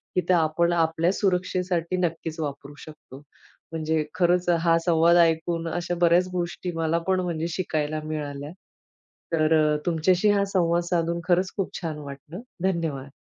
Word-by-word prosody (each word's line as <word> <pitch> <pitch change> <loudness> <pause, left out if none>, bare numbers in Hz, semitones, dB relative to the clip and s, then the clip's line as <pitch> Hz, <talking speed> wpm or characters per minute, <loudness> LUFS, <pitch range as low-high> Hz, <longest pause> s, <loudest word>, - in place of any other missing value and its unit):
की 180 - +3
ते - - +6
आपण 170 +1 +2
आपल्या 165 +1 +1
सुरक्षेसाठी 180 -2 -1
नक्कीच 165 -2 -2
वापरू 145 -1 -5
शकतो. 150 -3 -13 0.5
म्हणजे 160 -1 -1
खरंच 180 0 +2
हा 165 -1 +4
संवाद 170 0 +4
ऐकून 165 0 +2
अशा 175 +1 -2
बऱ्याच 175 +1 +4
गोष्टी 175 0 -3
मला 165 0 0
पण 190 -1 +2
म्हणजे 170 -2 -2
शिकायला 155 -3 -2
मिळाल्या. 145 -2 -5 0.8
तर 155 0 +3
अ, 155 -1 +3
तुमच्याशी 175 +4 +2
हा 200 -1 +2
संवाद 170 -2 +2
साधून 170 -1 0
खरंच 185 +1 +2
खूप 195 - -1
छान 160 -3 -4
वाटलं. 145 +4 -9 0.2
धन्यवाद. 165 -7 -1
165 Hz, 145 wpm, -25 LUFS, 155-180 Hz, 0.8 s, ते